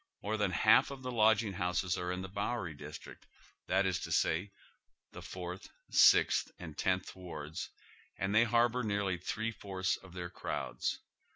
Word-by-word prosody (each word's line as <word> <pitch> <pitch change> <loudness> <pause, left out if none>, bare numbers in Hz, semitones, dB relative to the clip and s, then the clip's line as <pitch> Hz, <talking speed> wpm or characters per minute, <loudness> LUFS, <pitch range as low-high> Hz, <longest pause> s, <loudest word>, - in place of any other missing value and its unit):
More 105 +2 -1
than 105 -2 +1
half 85 - +5
of 135 -2 -8
the 125 - -3
lodging 110 -2 +3
houses 90 0 0
are 90 0 -3
in 90 +1 -3
the - - -5
Bowery 100 -2 -3
district, 75 +2 -10 0.4
that 95 +1 +2
is 95 -2 +1
to - - -6
say, 90 +6 +1 0.6
the - - -9
Fourth, 90 0 -7 0.2
Sixth, - - +5
and 80 -4 -8
Tenth 95 -1 -1
"Wards, 80 -4 -6 0.5
and 100 +1 -1
they 110 +2 +6
harbor 120 +2 +3
nearly 100 -5 -1
three 110 +5 -2
fourths 95 -3 -2
of 95 -2 -15
their 90 -1 -5
crowds. - - -3
95 Hz, 165 wpm, -33 LUFS, 90-105 Hz, 0.6 s, they